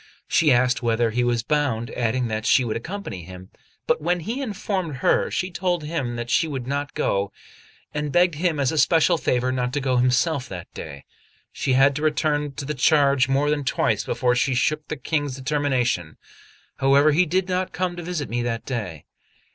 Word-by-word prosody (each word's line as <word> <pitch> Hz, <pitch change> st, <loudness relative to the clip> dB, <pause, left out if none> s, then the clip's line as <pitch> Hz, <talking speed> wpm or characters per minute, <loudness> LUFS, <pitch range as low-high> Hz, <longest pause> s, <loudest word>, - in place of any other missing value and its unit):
She 160 Hz, -3 st, +3 dB
asked 125 Hz, +1 st, +3 dB
whither 115 Hz, -1 st, +1 dB
he 120 Hz, +3 st, 0 dB
was 120 Hz, -1 st, 0 dB
bound, 135 Hz, -5 st, -1 dB
adding 120 Hz, +1 st, -1 dB
that 110 Hz, 0 st, -3 dB
she 130 Hz, -, +4 dB
would 110 Hz, -, -2 dB
accompany 160 Hz, -, -6 dB
him; 95 Hz, +2 st, -11 dB, 0.3 s
but -, -, +1 dB
when 175 Hz, +2 st, 0 dB
he 230 Hz, -, -4 dB
informed 200 Hz, -, -3 dB
her, -, -, +3 dB
she 185 Hz, 0 st, -2 dB
told 175 Hz, -2 st, -1 dB
him 145 Hz, -6 st, -3 dB
that 120 Hz, 0 st, -4 dB
she 165 Hz, -, +3 dB
would 135 Hz, -5 st, -4 dB
not 145 Hz, +2 st, -3 dB
go, 100 Hz, 0 st, 0 dB, 0.6 s
and 150 Hz, -1 st, -2 dB
begged 175 Hz, +1 st, +3 dB
him 160 Hz, 0 st, -1 dB
as 135 Hz, -2 st, +1 dB
a 160 Hz, -, 0 dB
special 165 Hz, +2 st, +4 dB
favour 125 Hz, -2 st, 0 dB
not 125 Hz, -1 st, -1 dB
to 145 Hz, -, 0 dB
go 130 Hz, -2 st, 0 dB
himself 130 Hz, +3 st, +1 dB
that 90 Hz, -3 st, -8 dB
day. 70 Hz, -1 st, -9 dB, 0.5 s
She 130 Hz, -, -1 dB
had 135 Hz, +2 st, +4 dB
to -, -, -4 dB
return 150 Hz, -1 st, 0 dB
to 135 Hz, -, -6 dB
the 150 Hz, -, -2 dB
charge 140 Hz, -2 st, +3 dB
more 140 Hz, +2 st, +2 dB
than 145 Hz, -1 st, 0 dB
twice 110 Hz, -5 st, 0 dB
before 125 Hz, -1 st, 0 dB
she 130 Hz, +1 st, +1 dB
shook 150 Hz, +5 st, 0 dB
the 155 Hz, -, -4 dB
King's 145 Hz, -2 st, -2 dB
determination; 130 Hz, -, -1 dB, 0.6 s
however, 140 Hz, +3 st, +4 dB
he 175 Hz, +4 st, +3 dB
did 185 Hz, +3 st, 0 dB
not 185 Hz, 0 st, -1 dB
come 180 Hz, -1 st, -2 dB
to 175 Hz, -, -6 dB
visit 170 Hz, -3 st, -3 dB
me 120 Hz, +1 st, -2 dB
that 115 Hz, -1 st, -3 dB
day. 100 Hz, -, -5 dB
140 Hz, 195 wpm, -23 LUFS, 120-155 Hz, 0.6 s, she